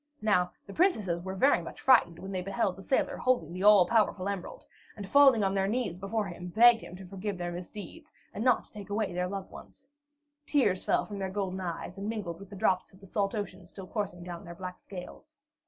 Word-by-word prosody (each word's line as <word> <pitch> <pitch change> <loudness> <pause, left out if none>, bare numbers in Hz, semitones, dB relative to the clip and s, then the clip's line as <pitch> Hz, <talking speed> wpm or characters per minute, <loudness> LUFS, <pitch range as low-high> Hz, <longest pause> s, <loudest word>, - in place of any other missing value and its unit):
Now, 180 -4 +3
the 200 - -10
princesses 210 - +1
were 190 0 -5
very 270 +9 +4
much - - -9
frightened 230 -10 +4
when 190 - -7
they 185 -1 -2
beheld 195 0 -1
the 195 - -11
sailor 265 - 0
holding 240 -11 +1
the 180 - -5
all 205 -2 +7
powerful 200 -2 +2
emerald, 200 -3 -5 0.3
and 200 -2 -6
falling 270 -3 +6
on 195 0 +1
their 195 -1 +1
knees 210 -5 -1
before 210 +2 -1
him, 180 -1 -7
begged 230 +5 +6
him 180 - -10
to 190 +1 -10
forgive 195 +1 -5
their 175 0 -3
misdeeds, 205 - -8 0.2
and 215 - -3
not 250 -1 +3
to - - -15
take 205 -2 -9
away 205 -2 -1
their 180 +1 -1
loved 195 0 -6
ones. 275 - -13 0.6
Tears 205 -11 +2
fell - - +1
from 205 -1 -7
their 190 -1 -2
golden 190 -1 -3
eyes, 180 +1 -5
and 200 +2 -3
mingled 190 -7 -4
with 195 -1 -11
the 200 - -9
drops 185 -1 +1
of 190 - -19
the 200 - -14
salt 195 +2 -1
ocean 200 -3 -5
still 190 +1 -9
coursing 190 -3 -4
down 175 -1 -7
their 170 0 -9
black 180 0 -7
scales. 200 +11 -10
195 Hz, 225 wpm, -30 LUFS, 180-215 Hz, 0.6 s, all